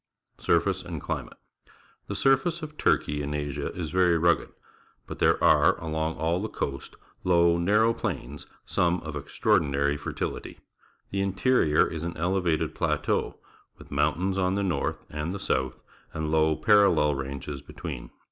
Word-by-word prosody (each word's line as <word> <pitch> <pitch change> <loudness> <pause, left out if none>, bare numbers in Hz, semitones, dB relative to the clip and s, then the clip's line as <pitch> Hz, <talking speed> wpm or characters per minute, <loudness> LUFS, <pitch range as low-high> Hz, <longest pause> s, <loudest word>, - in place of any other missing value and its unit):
Surface - - +1
and - - -6
Climate.— - - -5 0.7
The - - -4
surface 150 +5 +2
of 155 0 -7
Turkey 75 - +1
in 75 +1 -3
Asia 75 -2 -3
is 85 -4 -5
very 90 -2 +3
rugged, 85 +1 +2 0.6
but - - -8
there - - +4
are - - +5
along 80 0 -2
all 85 +3 0
the 110 - -3
coast 70 -1 -5 0.3
low, 85 -1 +4
narrow 105 +6 +3
plains, 70 - -5 0.2
some 90 0 +1
of 80 -1 -7
extraordinary 70 0 +1
fertility. - - -5 0.5
The 100 - -1
in 100 -1 -1
terior 100 -9 +3
is 80 - -5
an 85 +1 -4
elevated 85 -1 0
plateau, - - -1 0.4
with - - -15
mountains 80 +7 0
on 90 0 +1
the 100 - 0
north 90 -3 -2
and 75 +3 -4
the 100 - -5
south, 65 -5 -1 0.4
and 80 -1 -2
low, 80 0 +3
parallel 100 -7 +4
ranges 70 +1 -5
between. - - -7
80 Hz, 150 wpm, -27 LUFS, 75-95 Hz, 0.7 s, are